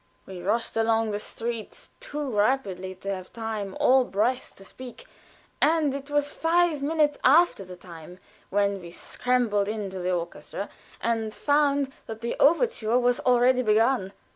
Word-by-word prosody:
We 185 -2 -8
rushed 215 +6 -1
along 225 -1 +2
the 205 - -2
streets 230 +1 -6
too 295 -1 -5
rapidly 200 -5 0
to 195 +2 -4
have 185 -1 -10
time 220 -4 -5
or 260 0 +5
breath 245 +4 -1
to 195 - -14
speak, 255 - -11 0.6
and 310 -2 +3
it 280 +1 -6
was 290 0 0
five 330 -2 +1
minutes 295 0 +1
after 300 - +5
the 185 -1 -10
time 175 -1 -12 0.3
when 200 -1 +1
we 170 - -9
scrambled 220 +1 0
into 205 -3 -4
the 180 0 -1
orchestra, 180 +3 -4 0.3
and 225 -1 -1
found 285 -2 +1
that 220 0 -7
the 235 - -2
overture 280 - +3
was 245 0 +2
already 250 0 +3
begun. 220 -2 +2
230 Hz, 150 wpm, -26 LUFS, 200-275 Hz, 0.6 s, or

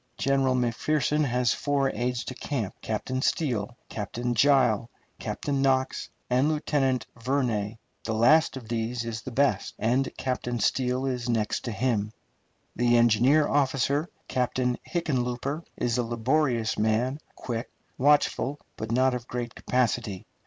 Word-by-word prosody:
General 135 -1 +2
McPherson 145 +5 +1
has 125 -2 +2
four 140 -2 0
aides 125 0 -1
de - - -5
camp: 120 -5 -3
Captain 130 +4 -2
Steele, 120 -7 -1
Captain 120 +4 -3
Gile, 120 -3 +3 0.3
Lieutenant 140 -2 -2
Knox, 130 -1 +1 0.2
and 130 +4 +2
Lieutenant 135 -5 +1
Vernay. 115 -4 -1 0.3
The 110 - -2
last 135 +6 +4
of 120 -4 -9
these 115 +1 -2
is 115 -1 -4
the - - -6
best, 140 +3 +1
and 125 +4 +1
Captain 125 -2 -2
Steele 125 +4 +1
is 125 -2 -2
next 110 -3 0
to 120 - -2
him. 110 -2 0 0.6
The 120 0 +3
engineer 120 +6 +4
officer, 140 +2 +1 0.2
Captain 125 0 0 0.2
Hickenlooper, 140 -3 -1 0.2
is 120 0 0
a - - +2
laborious 120 0 0
man, 115 +6 +1 0.2
quick, 115 -1 -4 0.3
watchful, 145 0 +3 0.2
but 110 0 -4
not 130 +2 +3
of 125 -1 -4
great 120 -1 -4
capacity. 115 -6 -1
125 Hz, 135 wpm, -27 LUFS, 115-135 Hz, 0.6 s, last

